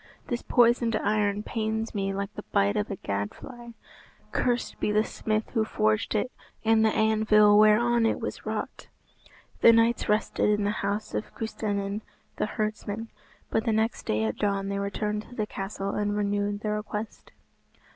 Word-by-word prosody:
This 240 -1 -1
poisoned 235 -1 +3
iron 210 -1 +1
pains 220 0 -2
me 195 -2 -1
like 200 +1 -4
the - - -6
bite 200 0 +2
of 210 0 -1
a 200 - -3
gad 100 - -3
fly. 240 -2 -11 0.6
Cursed 245 -1 -1
be - - 0
the 215 +1 +3
smith 215 -1 -2
who 225 -3 +1
forged 215 0 0
it, 250 +4 0 0.3
and 220 0 +4
the 220 - +5
anvil 215 -1 +4
whereon 230 +2 +5
it - - 0
was - - -5
wrought." - - -5 0.7
The 230 - +9
knights 230 0 +3
rested 210 0 +1
in 210 0 +2
the 205 - +1
house 205 +2 -2
of - - -4
Custennin 205 -2 -3 0.4
the - - 0
herdsman, 215 +1 -3 0.4
but 220 - +1
the 230 - +2
next 220 +1 -1
day 110 +1 +1
at 110 -1 -1
dawn 200 -1 0
they 200 0 -2
returned 210 +1 -2
to 245 - -12
the 215 - -1
castle 195 -1 -4
and 205 0 -1
renewed 205 0 -1
their 215 -1 -1
request. 210 +1 -6
215 Hz, 170 wpm, -27 LUFS, 205-220 Hz, 0.7 s, The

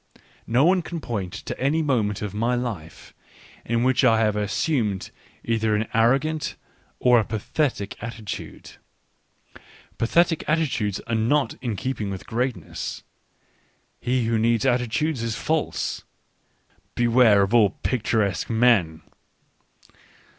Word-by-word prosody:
No 125 +5 +3
one 185 +1 +4
can 170 0 -6
point 100 - -4
1 - - -7
to - - -5
any 150 +5 +1
moment 110 -8 0
of 100 -2 -4
my 115 +4 0
life 105 -10 -6 0.5
in 115 +1 0
which 130 +1 +2
I 115 -3 +5
have 105 -2 +2
assumed 105 - -1 0.2
/ - - -31
either 110 -2 +1
an 105 +1 -1
arrogant 135 +7 +1 0.4
or 125 -1 +5
a - - +1
pathetic 110 +1 -2
attitude. 115 -3 -7 1.2
Pathetic 165 +7 +2
f 155 - +3
attitudes 115 - -1
are 115 - -5
not 120 +6 +1
in 120 -5 -2
keeping 105 -1 -3
with 95 -1 -6
greatness; 120 -7 -3 1.0
he 125 -1 0
whcj 115 -1 +1
needs 115 +1 +2
attitudes 125 +3 0
is 115 -1 -2
false.... 155 +6 -2 0.9
Beware 120 -4 +5
of 100 +3 -2
all 110 -4 +6
p 125 - +1
ictur 110 -1 +1
escjue 95 - -4
men 110 -9 +2
115 Hz, 135 wpm, -24 LUFS, 105-130 Hz, 1.2 s, all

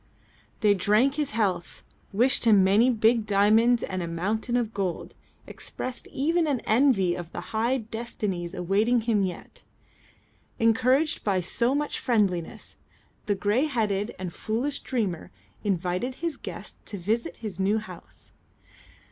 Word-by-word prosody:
They 210 -2 +5
drank 210 +8 +3
his 295 -1 -1
health, 195 -6 -1 0.3
wished 240 +5 +2
him 210 -4 +6
many 205 +6 +4
big 225 -1 +2
diamonds 220 +4 +4
and 185 -1 -3
a 170 - -3
mountain 210 +8 -1
of 230 -2 -2
gold, 190 -4 -3 0.3
expressed 255 0 -6
even 325 +4 0
an 275 -4 +1
envy 220 -7 +3
of 175 -1 -7
the - - -5
high 235 +4 +1
destinies 215 -6 -4
awaiting 205 +7 +2
him 220 -2 +1
yet. 185 -3 -5 1.0
Encouraged 255 +6 +2
by 195 -3 +1
so 235 +8 0
much 295 0 -2
friendliness, 200 -9 -1 0.5
the 205 - +2
grey 210 +8 +1
headed 215 -6 -1
and 180 -2 -5
foolish 245 +7 -2
dreamer 205 -10 -3 0.3
invited 185 +5 -1
his 335 0 -3
guests 185 -4 -9
to 205 - -5
visit 205 0 -2
his 195 -4 -5
new 200 +3 +2
house. 215 - -10
215 Hz, 140 wpm, -26 LUFS, 190-245 Hz, 1.0 s, him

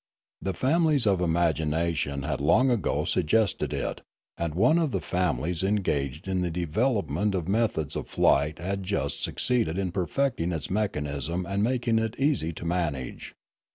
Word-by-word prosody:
The 95 -2 -2
families 150 - +2
of 95 -3 +2
imagination 80 -4 0
had 70 -2 -2
long 120 - +4
ago 110 -8 0
suggested^ 110 +5 +1
it, - - -3 0.3
and 85 -2 -3
one 125 - +4
of 160 -3 +1
the - - -1
families 90 -2 -1
engaged 85 -7 -1
in 95 -1 0
the 90 - 0
development 95 - 0
of 90 -3 -2
methods 100 -8 0
of - - -4
flight 75 +4 +2
had 95 +3 -3
just 70 -8 -2
succeeded 115 -9 0
in 95 -2 -1
perfecting 90 0 -1
its 80 0 -4
mechanism 85 - -2
and 100 +2 -1
making 115 0 +1
it 115 +1 -2
easy 135 - +1
to 85 - -8
manage. 80 -7 -3
90 Hz, 155 wpm, -27 LUFS, 80-110 Hz, 0.3 s, long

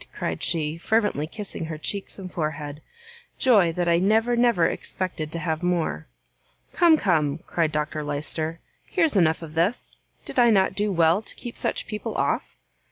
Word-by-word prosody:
cried - - -3
she, 160 -1 -1
fervently 210 -7 +1
kissing 200 -2 -6
her 160 -1 -5
cheeks 195 +5 -2
and 185 -2 -8
forehead, 150 -2 -4 0.6
"joy 205 -10 +4
that 175 +1 -2
I 170 0 +4
never, 220 +5 +3
never 235 -8 +3
expected 165 -5 -3
to 170 - -4
have 160 -1 -2
more!" 170 - -1 0.7
"Come, 335 -2 +5
come," 155 - +1
cried 165 -2 0
Dr 150 0 -2
Lyster, 155 +3 -2 0.3
"here's 330 - +2
enough 165 -3 +3
of 155 -1 -9
this; 175 +9 -1 0.3
did - - -2
I 240 -1 +6
not 195 -4 +3
do 205 +1 0
well 170 +2 +3
to - - -10
keep 240 - -8
such - - -2
people 215 -1 -5
off?" - - -1
170 Hz, 165 wpm, -25 LUFS, 155-210 Hz, 0.7 s, I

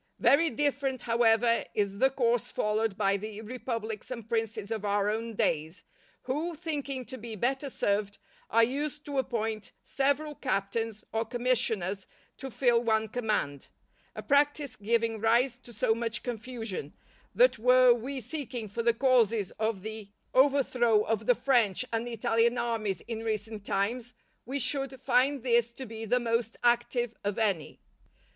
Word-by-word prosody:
_" - - -45 0.2
Very 320 +4 +5
different, 275 -1 -1
however, 230 0 +3
is 200 -1 -1
the 265 - +5
course 240 -4 0
followed 210 -1 0
by 200 -1 +2
the 215 +1 -7
republics 225 -2 -5
and 235 -4 -6
princes 225 -2 -2
of 220 -2 -2
our 205 0 +1
own 225 +1 -3
days, 160 -1 -1 0.4
who, 305 +7 -2
thinking 285 -5 -4
to 260 +3 -9
be 225 0 -7
better 265 +6 -1
served, 200 -4 -1 0.3
are 230 +2 +5
used 290 +4 -2
to 285 -2 -1
appoint 225 -4 -2
several 285 +2 0
captains 225 -3 -2
or 225 0 +1
commissioners 225 -5 -1 0.3
to 270 - -6
fill 240 -2 +2
one 220 -1 +1
command; 210 - -2 0.5
a - - -6
practice 285 -1 +2
giving 225 +1 0
rise 240 +3 +2
to 245 - -15
so 220 0 +1
much 230 -1 -3
confusion, 225 - -5 0.4
that - - +5
were 250 +1 +6
we 260 +4 -4
seeking 250 -2 -5
for 210 +4 -3
the 230 0 +2
causes 230 -6 +3
of 220 -3 -1
the 215 -2 -6 0.2
overthrow 255 -5 +4
of 220 -1 -2
the 245 - +5
French 240 -5 +2
and 230 +1 -1
Italian 230 +1 +1
armies 225 -6 -1
in 225 -2 -5
recent 215 -1 -3
times, 235 +6 -2 0.3
we 270 +3 -2
should 270 0 -3
find 260 +1 +2
this 235 -2 +3
to 260 +3 -9
be 225 -1 -7
the 245 +3 +2
most 230 -1 -1
active 240 0 +2
of 205 0 -2
any. 200 -9 -1
230 Hz, 155 wpm, -29 LUFS, 215-255 Hz, 0.5 s, were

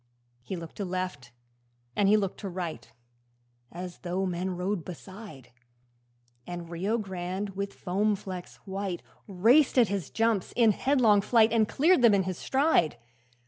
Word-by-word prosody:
He 185 - -5
looked 165 -2 -9
to 205 - -2
left 185 -9 -4 0.6
and 200 -1 +3
looked 205 -3 +2
to 200 - -5
right, 170 -9 -6 0.8
As 180 0 -7
though 185 +2 -2
men 180 0 -2
rode 185 -1 -2
beside; 185 - -10 1.0
And 175 -1 -7
Rio 195 +7 -1
Grande, 190 -1 -4
with 200 +1 -5
foam 205 +3 0
flecks 185 -2 -8
white, 195 -2 -4 0.2
Raced 230 +10 +4
at 235 -6 +5
his 195 -7 -3
jumps 225 -4 0
in 230 -3 +5
headlong 225 -3 +3
flight 225 +1 +4
And 220 -2 +3
cleared 320 +1 +4
them 230 -4 +6
in 195 - +2
his 185 -1 -4
stride. 265 - +2
195 Hz, 145 wpm, -28 LUFS, 180-215 Hz, 1.0 s, them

